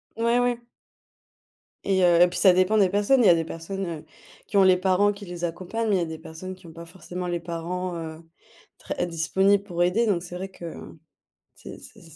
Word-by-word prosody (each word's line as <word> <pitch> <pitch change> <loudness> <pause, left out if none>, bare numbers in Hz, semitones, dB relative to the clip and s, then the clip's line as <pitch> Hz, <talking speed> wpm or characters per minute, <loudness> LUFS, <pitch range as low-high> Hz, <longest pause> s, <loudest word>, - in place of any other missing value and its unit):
Ouais, 235 +2 +2
ouais. 245 -1 +1 1.3
Et 190 -1 +2
heu, 175 -1 +5
et 175 - +8
puis 175 - -4
ça 185 -3 +6
dépend 185 +4 +3
des 195 -3 +4
personnes. 205 +6 +3
Il - - +4
y - - +8
a 175 - +7
des 165 - 0
personnes, 165 +4 -6
heu, 165 -3 -6 0.4
qui - - -8
ont 195 - +7
les 185 -1 +5
parents 190 +2 +2
qui 200 0 -10
les 175 -1 -8
accompagnent, 185 +7 -3
mais 200 - +3
il - - 0
y - - 0
a - - 0
des 160 -1 -7
personnes 165 +4 -9
qui 185 -1 -20
ont - - -11
pas 170 0 -10
forcément 180 +1 -7
les 175 -1 -2
parents, 175 +2 -4
heu, 160 -1 -7 0.6
très - - -3
disponibles 190 +4 +2
pour 175 -3 -2
aider. 220 +6 +1
Donc 185 -5 +1
c'est 175 0 -9
vrai 190 +2 -5
que, 185 -2 -13
heu, 165 -1 -9 0.6
c'est - - -11
c'est 215 - -16
180 Hz, 230 wpm, -25 LUFS, 170-200 Hz, 1.3 s, et